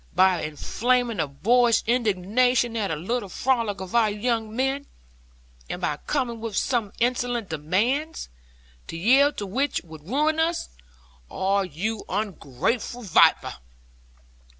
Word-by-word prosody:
By 185 -2 +4
inflaming 235 - 0
the 155 - 0
boorish 230 - +3
indignation 235 +2 +1
at 210 -4 -1
a 160 - -1
little 200 +6 -3
frolic 230 -4 0
of 185 -1 -7
our 230 -2 +4
young 220 +1 -2
men; 270 +3 -1 0.8
and - - -4
by 150 - -1
coming 245 -6 -1
with 230 +3 -2 0.3
insolent 245 -2 0
demands, 210 - -1 0.6
to 165 - -6
yield 270 - +4
to 205 - -3
which 260 +9 -1
would 160 0 -13
ruin 305 +5 +1
us. 330 +1 0 0.6
Ah, 195 +1 +1
you 195 +5 -3
ungrateful 205 - -2
viper!' 195 - +4
225 Hz, 125 wpm, -25 LUFS, 190-250 Hz, 0.8 s, By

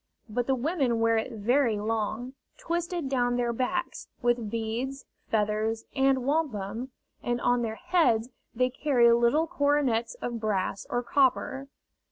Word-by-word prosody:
But 240 +2 -2
the 265 - +3
women 260 -3 0
wear 230 0 +3
it 220 +3 -2
very 230 +1 +1
long, 220 +3 -2 0.2
twisted 340 -2 -2
down 245 -2 +1
their 240 -1 0
backs, 345 +9 -2
with 240 -3 0
beads, 230 +5 -3 0.2
feathers, 215 +1 0
and 265 -2 +2
wampum, 250 -6 -1 0.3
and 240 0 -1
on 245 0 +2
their 220 -2 -2
heads 240 -8 +2 0.3
they 255 +2 +2
carry 245 -4 +4
little 235 +7 +3
coronets 285 - +1
of 240 - -4
brass 200 -3 -2
or 245 0 -1
copper. 265 +1 +1
245 Hz, 140 wpm, -28 LUFS, 225-270 Hz, 0.3 s, carry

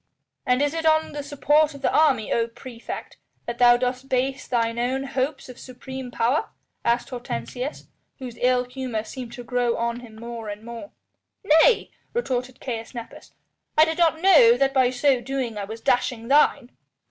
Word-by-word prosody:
"And 250 +3 +3
is 290 +1 0
it 325 0 -3
on 315 0 +3
the 295 - -5
support 295 +1 +2
of 280 - -12
the - - +1
army, 265 -9 +3
O 230 0 +1
praefect! 235 0 -9 0.3
that 235 0 -5
thou 240 -1 +7
dost 250 +2 -3
base 260 +1 -1
thine 230 -1 0
own 260 +3 -1
hopes 270 +1 -3
of 250 -1 -11
supreme 260 0 -8
power?" 250 - 0 0.3
asked 235 +1 +1
Hortensius, 245 - -5 0.3
whose 250 -3 -8
ill 250 0 +3
humour 250 -3 -4
seemed 245 +1 -8
to 245 - -8
grow 240 0 0
on 235 +1 -2
him 235 -3 -13
more 230 -1 -7
and 205 +1 -7
more. 235 +5 -8 0.5
"Nay!" 325 +6 +4 0.2
retorted 255 - -2
Caius 230 -1 -6
Nepos, 235 -1 -10 0.4
"I 310 - +8
did 320 +1 -3
not 325 -2 +3
know 305 -11 +6
that 270 +1 +2
by 260 -2 +4
so 255 0 +2
doing 255 -2 -3
I 205 -1 -4
was 220 +3 -8
dashing 245 -1 0
thine!" 280 -3 +3
250 Hz, 175 wpm, -24 LUFS, 235-275 Hz, 0.5 s, I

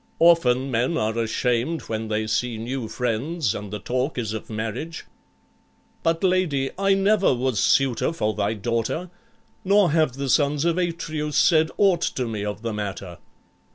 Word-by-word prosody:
"Often 135 -6 +4
men 125 +8 +1
are 110 -3 -1
ashamed 120 +6 0
when 110 0 -4
they 110 0 -1
see 115 +2 -1
new 120 +1 -4
friends 125 - -1
and 105 0 -6
the 105 - -4
talk 130 +8 -2
is 110 -3 -2
of 110 - -6
marriage." 115 +10 -5 1.0
"But, 165 +1 0
lady, 180 -8 +1
I 195 +1 +2
never 195 -5 +3
was 125 -3 -1
suitor 135 +1 +2
for 110 -10 -1
thy 105 +1 -1
daughter. 115 - -2 0.5
Nor 200 -3 +4
have 155 -4 +2
the 140 +1 -4
sons 145 +3 +2
of 170 +1 +1
Atreus 155 -4 -2
said 160 -2 +4
aught 190 -4 +3
to 125 -2 -1
me 110 -3 -4
of 105 +1 -5
the 115 -1 -2
matter." 100 -4 -5
130 Hz, 160 wpm, -23 LUFS, 110-165 Hz, 1.0 s, Often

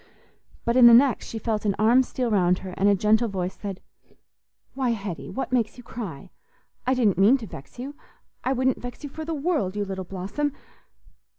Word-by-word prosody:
But 235 - +1
in 250 -2 +9
the 235 - +9
next 260 +1 +3
she 225 - -6
felt 220 -2 -2
an 200 -2 +1
arm 230 +5 +5
steal 250 -2 -2
round 180 -3 +3
her, 185 - -6
and 200 +2 +3
a 200 - +5
gentle 215 +4 +3
voice 185 -3 -3
said, 195 -2 -7 0.9
"Why, 265 -2 -1
Hetty, 195 -5 -6
what 265 - -4
makes 235 -3 0
you 245 - -11
cry? 195 - -7 0.6
I 260 - +3
didn't 215 -7 +2
mean 215 +8 +6
to 235 - -8
vex 140 - -11
you. 265 +4 -6 0.5
I 260 - 0
wouldn't 260 0 +1
vex 245 +3 -8
you 290 - -6
for 315 +2 -6
the 325 0 -3
world, 280 - -1
you 205 -1 -1
little 190 -1 -5
blossom. 195 +11 -3
225 Hz, 200 wpm, -25 LUFS, 195-255 Hz, 0.9 s, in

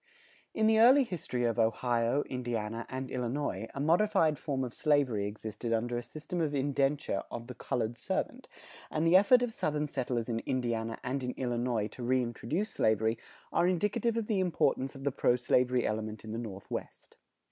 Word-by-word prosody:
In 220 - +2
the 220 0 +5
early 260 +5 +7
history 160 - -3
of 115 -1 +1
Ohio, 120 +3 +2
Indiana, 115 -3 -4
and 130 0 -5
Illinois, 125 -4 -2
a - - -4
modified 165 0 +3
form 135 -4 -2
of 120 -2 -5
slavery 135 -9 +2
existed 110 +2 -5
under 120 +2 0
a 120 - -1
system 155 +8 -5
of 150 -2 0
indenture 140 -4 0
of 120 0 -6
the 125 - -8
colored 120 -1 -2
servant; 250 - -3 0.4
and 155 +1 0
the 165 +2 +5
effort 240 +6 +6
of 240 -2 -2
Southern 150 -5 -1
settlers 125 -5 -2
in 115 -2 -1
Indiana 115 -3 -2
and 130 +1 -2
in 125 - -1
Illinois 120 -3 -1
to 125 - -11
reintroduce 125 - -1
slavery 110 +1 +1 0.3
are 175 - +3
indicative 210 +6 +1
of 230 - 0
the 210 -3 0
importance 165 -7 +1
of 135 - -9
the 140 - +1
pro 125 -2 +2
slavery 125 0 +2
element 110 0 -3
in 110 - -7
the 115 - -3
Northwest. 100 -5 -7
125 Hz, 175 wpm, -31 LUFS, 115-155 Hz, 0.4 s, early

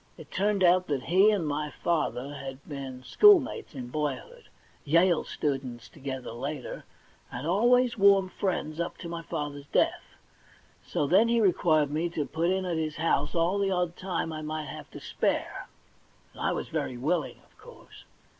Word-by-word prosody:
It - - -13
turned 200 0 +1
out 180 +1 +4
that 140 -4 -1
he 190 +7 +5
and 200 -6 +1
my 150 +1 -2
father 145 -5 -1
had 135 -1 -8
been 135 -3 -7
schoolmates 335 - +4
in 125 -2 -6
boy 150 0 -1
hood, 485 -1 -14 0.4
Yale 170 +3 +3
students 130 -4 -3
together 130 -2 -6
later, 135 +4 -6 0.5
and 125 +4 -5
always 240 +6 +3
warm 195 -1 +6
friends 175 -5 -3
up 170 - -3
to 170 - -8
my 170 0 -5
father's 145 -4 -5
death. - - 0 0.7
So - - -1
then 195 +10 +4
he 235 0 +2
required 160 -7 +3
me 160 +3 -1
to 150 - 0
put 165 +4 -1
in 190 0 0
at 175 -2 -1
his 155 -1 -2
house 155 -2 0
all 175 +4 +2
the 200 -1 +1
odd 180 -2 0
time 185 -3 -3
I 155 - -5
might 155 0 -4
have - - -9
to - - -10
spare, - - -2 0.7
and - - -11
I - - +1
was - - -4
very 125 - -3
willipg, 155 +8 -1
of - - -30
course. 485 +3 -15
165 Hz, 175 wpm, -28 LUFS, 145-190 Hz, 0.7 s, warm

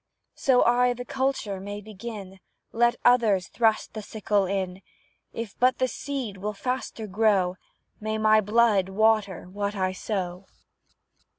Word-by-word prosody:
So 260 -2 +3
I 245 +1 +3
the 245 +1 -7
culture 260 -8 -2
may 205 +2 -6
begin, 205 -2 -9 0.3
Let 240 +1 +3
others 220 -8 +4
thrust 225 -2 +1
the 215 - -5
sickle 205 -2 0
in; 190 -1 -3 0.5
If 225 -3 -6
but 255 +1 +4
the 255 - +1
seed 255 -4 -5
will 210 +3 -3
faster 250 0 -4
grow, 195 -3 +2 0.4
May 215 0 -2
my 215 0 +5
blood 210 -2 +3
water 210 -2 +2
what 200 +2 -3
I 185 -1 0
sow! 185 -1 -4
215 Hz, 135 wpm, -26 LUFS, 195-235 Hz, 0.5 s, my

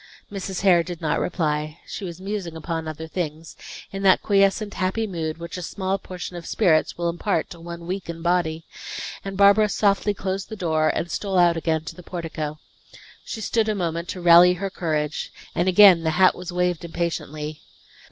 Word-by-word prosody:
Mrs. 195 -2 -4
Hare 185 -3 +5
did 175 -1 -6
not 155 -2 0
reply. 155 -3 -1
She - - -7
was 175 -2 -6
musing 190 -4 -4
upon 160 0 -4
other 155 +1 -6
things, 160 -2 -5 0.4
in 195 - -5
that 190 -2 +4
quiescent 200 +1 +2
happy 190 +5 -1
mood, 165 -5 -4
which 170 +2 -7
a - - -5
small 190 +2 -2
portion 180 -1 -7
of 170 -1 -7
spirits 165 -7 +2
will 170 0 -1
impart 170 0 -1
to 170 - -9
one 170 0 -8
weak 185 0 -4
in 165 -1 -6
body; 170 -2 0 0.6
and 195 -1 -5
Barbara 200 +2 +6
softly 205 0 +1
closed 190 0 -3
the 220 - -5
door, 160 -5 +1
and 170 - -2
stole 195 -2 -1
out 175 -1 +5
again 160 -1 0
to - - -6
the 180 - -11
portico. 165 -4 -5 0.7
She 220 - -6
stood 220 0 +1
a 215 - 0
moment 170 -2 -2
to 185 - -5
rally 175 +1 +8
her 195 +2 -4
courage, 155 -4 -2 0.2
and 175 +3 +1
again 185 -2 +8
the 160 - 0
hat 185 0 +6
was 180 -1 -7
waved 180 -1 0
impatiently. 155 -3 -4
175 Hz, 190 wpm, -23 LUFS, 165-195 Hz, 0.7 s, rally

